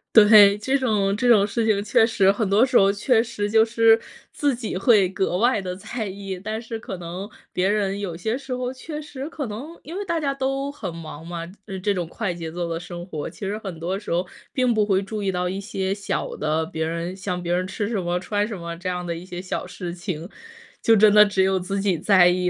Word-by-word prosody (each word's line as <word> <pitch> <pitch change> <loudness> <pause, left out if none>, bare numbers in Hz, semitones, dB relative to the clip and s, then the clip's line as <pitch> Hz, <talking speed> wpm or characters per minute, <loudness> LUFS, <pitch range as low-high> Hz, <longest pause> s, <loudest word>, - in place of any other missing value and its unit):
对， 210 -2 +8
这 265 +6 0
种， 210 -7 +1
这 245 +4 +1
种 210 -4 +6
事 225 +3 -1
情 200 -2 +2
确 215 +2 +4
实 200 -4 +3
很 205 0 -1
多 210 +5 +5
时 260 -1 -4
候 195 0 +5
确 220 +3 +2
实 225 -3 -3
就 220 +1 +5
是 225 0 +4 0.3
自 285 -3 0
己 230 -5 -5
会 195 0 +4
格 190 -1 -1
外 230 0 +2
地 180 -1 -4
在 215 +3 -5
意， 195 -1 -6
但 215 +3 -4
是 225 -1 -6
可 195 -3 -6
能 175 +4 -6 0.2
别 185 +2 +1
人 200 -1 0
有 180 -5 -4
些 220 +7 -1
时 270 0 -8
候 250 0 -2
确 300 +4 -7
实 290 -1 -7
可 310 -4 -4
能 260 +10 -7
因 325 - -8
为 405 - -2
大 340 -3 0
家 280 -3 0
都 275 +1 -2
很 200 - -6
忙 160 -1 -9
嘛。 170 0 -5 0.3
呃， 195 -2 -5
这 200 +2 0
种 180 -3 -3
快 190 +1 -3
节 165 -2 -6
奏 175 +1 -3
的 165 -1 -3
生 175 0 -8
活， 155 -6 -5
其 - - -17
实 200 +2 -2
很 190 -6 -7
多 180 +4 -2
时 205 - -10
候 175 +2 0 0.2
并 255 -2 +2
不 215 -1 +3
会 195 -2 +2
注 210 +2 -5
意 195 -1 0
到 180 -1 -1
一 190 +2 -3
些 195 -2 -2
小 200 -1 -3
的， 155 +1 0
别 160 0 -4
人 170 +2 -3
像 190 -2 -3
别 175 - -1
人 185 +1 0
吃 205 +2 -3
什 215 -3 -1
么、 175 0 -1
穿 205 +2 -1
什 215 -3 -5
么 170 -1 -6
这 185 +2 -4
样 180 -1 -3
的 170 - -3
一 165 - -8
些 180 -1 -7
小 180 0 -4
事 175 -1 -6
情， 170 -2 -5 0.5
就 225 - +5
真 210 0 +6
的 210 0 +9
只 200 -2 +2
有 190 0 +2
自 195 +2 -3
己 195 -4 +1
在 185 0 +6
意 180 0 +1
200 Hz, 265 characters per minute, -23 LUFS, 180-225 Hz, 0.5 s, 的